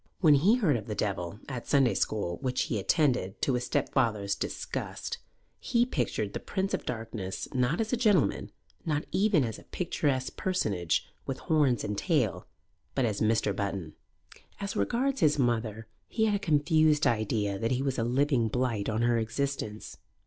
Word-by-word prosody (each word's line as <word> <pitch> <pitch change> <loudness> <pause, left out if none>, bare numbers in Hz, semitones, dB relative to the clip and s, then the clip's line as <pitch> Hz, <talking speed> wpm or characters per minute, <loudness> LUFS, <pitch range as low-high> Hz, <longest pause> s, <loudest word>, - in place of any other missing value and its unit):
When 160 -5 +6
he 180 - +5
heard 175 - +2
of 105 - -8
the 105 - -3
Devil, 100 -1 -2
at 125 -4 -6
Sunday 135 -4 +4
school, 85 -5 -1
which 130 -1 0
he 110 - -2
attended, 125 - +1
to 135 - +2
his 125 0 -1
stepfather's 105 -5 0
disgust, - - -4 0.4
he 240 0 +2
pictured 120 - -2
the - - -3
Prince 195 0 -2
of - - -2
Darkness 110 -5 -4
not 125 +5 +1
as 225 +1 -1
a - - +3
gentleman, 210 - +2 0.3
not 150 -1 -1
even 195 -7 +3
as 115 -3 -4
a - - -15
picturesque 145 -7 -1
personage 100 - 0 0.2
with 135 - -2
horns 145 -8 +2
and 105 -1 -2
tail, 145 - 0 0.5
but 135 - +2
as 105 -3 -2
Mr. 110 -2 +2
Button. 95 -6 -3 0.7
As 200 0 -4
regards 270 +3 0
his 150 -4 +4
mother, 115 -4 0 0.2
he 220 - +1
had 215 - +2
a 205 - +1
confused 155 -3 +3
idea 105 -3 0
that 115 - 0
he 130 +2 0
was 135 -2 -1
a - - +1
living 125 0 +2
blight 115 -3 -1
on 110 +1 0
her 120 -1 +3
existence. 115 -2 -3
125 Hz, 170 wpm, -29 LUFS, 110-155 Hz, 0.7 s, When